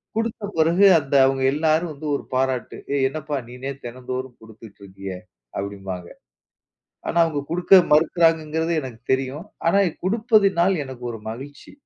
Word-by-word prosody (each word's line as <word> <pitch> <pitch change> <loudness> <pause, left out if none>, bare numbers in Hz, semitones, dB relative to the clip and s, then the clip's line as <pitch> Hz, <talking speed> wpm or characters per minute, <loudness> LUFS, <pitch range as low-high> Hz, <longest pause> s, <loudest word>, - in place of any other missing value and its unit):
குடுத்த 225 -1 -2
பிறகு 170 +5 +4
அந்த 140 -1 -3
அவங்க 135 0 +1
எல்லாரும் 160 +2 +1
வந்து 150 +2 -10
ஒரு - - -4
பாராட்டு. 130 -2 -1 0.2
ஏய் 135 -2 +2
என்னப்பா 150 0 -4
நீனே 130 +3 -6
தினந்தோறும் 125 +1 -6
குடுத்துட்டு 110 -2 -14
இருக்கியே! 95 -1 -7 0.4
அப்படிம்பாங்க. 95 -3 -5 1.0
ஆனா, 170 - -2
அவங்க 155 -3 -1
குடுக்க 180 +3 +2 0.2
மறுக்கிறாங்கங்கறது 160 +1 +2
எனக்கு 120 -4 -8
தெரியும். 135 +6 -3 0.2
ஆனா, 195 - +4
இ - - 0 0.2
குடுப்பதினால் 200 -4 +3
எனக்கு 130 -2 -10
ஒரு 115 - -8
மகிழ்ச்சி! 140 +5 -9
140 Hz, 135 wpm, -22 LUFS, 125-165 Hz, 1.0 s, பிறகு